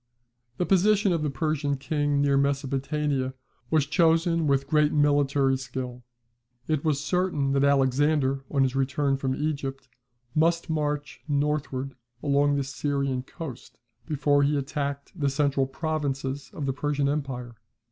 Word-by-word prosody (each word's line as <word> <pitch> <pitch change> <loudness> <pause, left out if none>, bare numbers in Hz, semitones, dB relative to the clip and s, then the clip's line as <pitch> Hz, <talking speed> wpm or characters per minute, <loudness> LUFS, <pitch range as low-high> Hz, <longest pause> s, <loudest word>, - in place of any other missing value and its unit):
The 180 - 0
position 200 +1 +3
of 165 - 0
the 150 - 0
Persian 145 0 -1
king 145 0 0
near 140 -1 +3
Mesopotamia 140 0 0 0.3
was 155 -3 +3
chosen 165 0 +2
with 135 -1 +2
great 150 +1 +3
military 145 -2 +3
skill. 125 -1 -6 0.7
It 155 -2 0
was 150 -3 +1
certain 150 -4 0
that 140 0 +2
Alexander 135 0 +2
on 140 -2 +2
his 130 0 0
return 140 +1 +1
from 130 -1 -1
Egypt 140 -3 -3 0.5
must 165 +2 +2
march 150 -1 -2
northward 140 -2 -1 0.3
along 145 0 +3
the 140 - 0
Syrian 135 -1 -1
coast, 135 -1 -9 0.3
before 145 -2 +2
he 145 +1 +2
attacked 140 0 -3
the 145 -5 0
central 140 -1 +1
provinces 135 -2 -3
of 145 - -5
the 135 - 0
Persian 145 0 0
empire. 135 -4 -3
140 Hz, 135 wpm, -26 LUFS, 135-150 Hz, 0.7 s, position